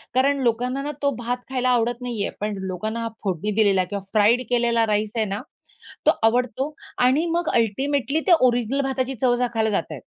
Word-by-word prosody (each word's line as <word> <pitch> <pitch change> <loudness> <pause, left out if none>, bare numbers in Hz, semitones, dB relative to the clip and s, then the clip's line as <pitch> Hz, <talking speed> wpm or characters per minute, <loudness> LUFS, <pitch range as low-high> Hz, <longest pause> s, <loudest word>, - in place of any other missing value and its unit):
कारण 275 +2 +3
लोकांना 250 +3 0
ना 295 - -3
तो 280 - +3
भात 245 +2 -2
खायला 255 -1 0
आवडत 240 0 +1
नाहीये, 235 -5 -2
पण 210 -1 -2
लोकांना 215 +5 -3
हा 230 - -2
फोडणी 195 +2 -1
दिलेला 200 -4 +3
किंवा 200 +1 -5
फ्राईड 220 +4 +4
केलेला 235 -1 +2
राईस 210 0 0
आहे 220 - +2
ना, 200 0 -4 0.6
तो - - +7
आवडतो 250 +5 +1 0.3
आणि 280 +6 +3
मग 345 -2 0
अल्टिमेटली 275 +6 0
ते - - +4 0.2
ओरिजिनल 245 +3 0
भाताची 265 -1 -2
चव 245 -1 +4
चाखायला 230 -3 0
जातायेत. 160 -7 -2
240 Hz, 180 wpm, -23 LUFS, 215-260 Hz, 0.6 s, तो